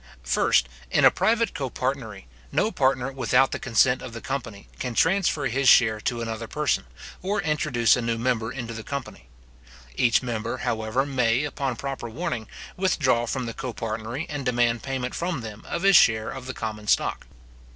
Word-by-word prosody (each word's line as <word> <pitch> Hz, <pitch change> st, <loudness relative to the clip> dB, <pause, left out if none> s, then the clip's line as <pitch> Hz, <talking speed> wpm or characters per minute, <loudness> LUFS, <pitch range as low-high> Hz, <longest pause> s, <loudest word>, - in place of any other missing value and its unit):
First, 60 Hz, -, +2 dB, 0.2 s
In -, -, +3 dB
a -, -, +8 dB
private 225 Hz, +5 st, +1 dB
copartnery, 130 Hz, -6 st, -3 dB, 0.3 s
no 220 Hz, -, +1 dB
partner 135 Hz, -, +1 dB
without 130 Hz, 0 st, +2 dB
the -, -, -3 dB
consent 125 Hz, +1 st, +3 dB
of 115 Hz, -, -8 dB
the 115 Hz, -, -6 dB
company, 115 Hz, -6 st, -5 dB
can 125 Hz, -2 st, -3 dB
transfer 180 Hz, -, +2 dB
his 130 Hz, +1 st, +3 dB
share 110 Hz, -3 st, +5 dB
to 120 Hz, +1 st, -2 dB
another 115 Hz, 0 st, -4 dB
person, 150 Hz, -, 0 dB, 0.4 s
or 200 Hz, +3 st, -1 dB
introduce 150 Hz, -8 st, +2 dB
a 125 Hz, -, -2 dB
new 115 Hz, -1 st, -1 dB
member 115 Hz, -1 st, 0 dB
into 120 Hz, -3 st, -5 dB
the 110 Hz, -, -6 dB
company. 140 Hz, +5 st, -7 dB, 0.7 s
Each 120 Hz, +1 st, +3 dB
member, 115 Hz, -2 st, -3 dB
however, 110 Hz, +4 st, -1 dB
may, 125 Hz, -2 st, +1 dB
upon 140 Hz, -3 st, -2 dB
proper 135 Hz, -2 st, -5 dB
warning, 125 Hz, -5 st, -4 dB, 0.3 s
withdraw 135 Hz, -11 st, +1 dB
from 130 Hz, +1 st, -2 dB
the 115 Hz, -, -5 dB
copartnery, 115 Hz, +3 st, -4 dB
and 145 Hz, -3 st, -4 dB
demand 120 Hz, -2 st, +1 dB
payment 130 Hz, -2 st, -3 dB
from 170 Hz, -5 st, -2 dB
them 110 Hz, -1 st, -8 dB
of 170 Hz, -, -3 dB
his 195 Hz, -3 st, +7 dB
share 110 Hz, -1 st, +4 dB
of 130 Hz, -1 st, -8 dB
the 130 Hz, -, -5 dB
common 105 Hz, -1 st, -5 dB
stock. -, -, +1 dB
125 Hz, 170 wpm, -25 LUFS, 115-140 Hz, 0.7 s, a